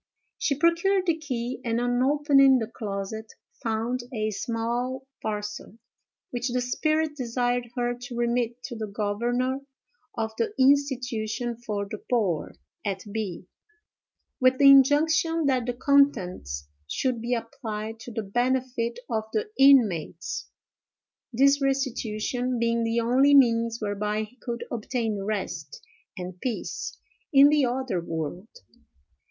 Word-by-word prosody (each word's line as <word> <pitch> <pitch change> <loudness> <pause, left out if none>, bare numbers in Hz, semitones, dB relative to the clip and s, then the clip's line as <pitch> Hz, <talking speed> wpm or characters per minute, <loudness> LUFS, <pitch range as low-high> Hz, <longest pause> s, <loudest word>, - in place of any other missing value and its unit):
She 280 - 0
procured 340 +4 +3
the 335 -3 +2
key, 255 -5 -4
and, 230 -1 0
on 245 0 +1
opening 275 -1 +5
the 225 - -1
closet, 215 -1 -5 0.3
found 230 +2 -1
a 215 -3 -1
small 240 +5 -2 0.2
parcel, 210 0 -5 0.5
which 245 +1 -2
the 250 +1 0
spirit 310 +5 0
desired 245 -1 -1
her 245 -1 0
to 245 0 -8
remit 240 0 -1
to 240 - -6
the 220 -1 -4
governor 235 +6 -1 0.6
of 220 -1 -1
the 230 - -1
institution 250 -4 +1
for 210 -4 -4
the 210 +1 -6
poor, 205 -10 0 0.3
at 195 -2 -3
B——, 200 -5 -4 0.9
with 255 0 +4
the 275 0 +8
injunction 315 +4 +4
that 255 -3 +1
the 245 - 0
contents 190 - +1 0.2
should 250 - -1
be 240 +2 0
applied 225 -2 -5
to 240 - -9
the 225 -1 -3
benefit 245 +2 -1
of 220 -2 -1
the 430 0 -1
inmates,—this 215 - +3 1.1
restitution 250 -2 -1
being 230 0 +1
the 230 +1 +1
only 265 +5 +4
means 230 -3 +4
whereby 210 +1 -1
he 215 +3 -12
could 235 -2 -5
obtain 225 -3 -2
rest 195 -8 -4 0.4
and 180 0 -7
peace 245 -4 -4 0.3
in 280 -1 +8
the 295 -3 +3
other 245 -7 -2
world. 165 +4 -4
240 Hz, 125 wpm, -26 LUFS, 215-265 Hz, 1.1 s, the